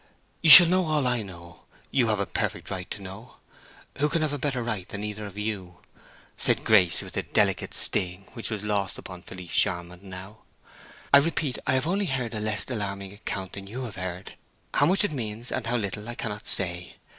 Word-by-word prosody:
"You 165 - +3
shall 175 +4 +14
know 180 0 +2
all 150 -3 +1
I 125 -2 +1
know—you 90 +6 -5
have 110 -2 0
a 100 - 0
perfect - - -3
right 90 -1 -5
to 100 - -7
know—who 110 +8 -7
can 160 +1 0
have 150 -2 -1
a 145 - -3
better 130 -3 -1 0.2
than 100 +3 -7
either 105 0 -5
of 100 0 -12
you?" 100 -4 -4 0.6
said - - +1
Grace, 95 -6 +4
with - - -10
a - - +1
delicate - - 0
sting 90 +1 +1
which 115 - -4
was 105 -3 -4
lost 100 -3 -1
upon 90 -2 -9
Felice 90 -2 -10
Charmond 90 +1 +2
now. 95 +2 -10 0.7
"I 140 - +10
repeat, 145 -3 -1
I - - +3
have 130 +2 +2
only 195 +4 0
heard 125 -5 -2
a 110 - -3
less 105 -1 -1
alarming 100 -5 -4
account 95 -2 -6
than 100 -1 -8
you 125 +6 -6
have 115 -4 -7
heard; 90 0 -6 0.4
how 145 - +3
much 190 +4 +2
it 205 - 0
means, 115 -3 -5
and 125 -3 -3
how 120 +1 +1
little, 105 +1 -3
I 120 - -5
cannot 105 -3 -5
say. 90 -2 -2
105 Hz, 200 wpm, -26 LUFS, 95-130 Hz, 0.7 s, shall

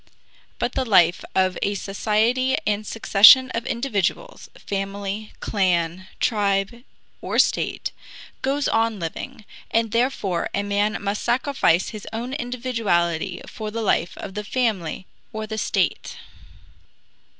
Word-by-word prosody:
But 240 - -1
the 260 - -1
life 180 -7 +4
of 185 -1 +2
a 200 - 0
society 220 +6 +1
and 210 0 -1
succession 225 +4 +7
of 230 0 -3
individuals, 235 - -2
family, 200 +1 -4
clan, 180 -2 0
tribe, 205 +1 0 0.4
or - - -3
state, - - +1 0.5
goes 275 +2 0
on 225 -1 +1
living, 170 +5 -6 0.2
and 225 -1 +1
therefore 230 -8 0
a 200 - 0
man 205 +2 0
must 205 +1 -2
sacrifice 240 - +1
his 215 -2 -9
own 235 +4 -4
individuality 230 - -1
for 215 -1 -6
the 225 +1 -4
life 185 -3 0
of 195 - -7
the 210 +1 -4
family 205 -7 -1 0.3
or 220 0 -4
the 220 0 -4
state. - - -1
215 Hz, 125 wpm, -23 LUFS, 195-235 Hz, 0.5 s, succession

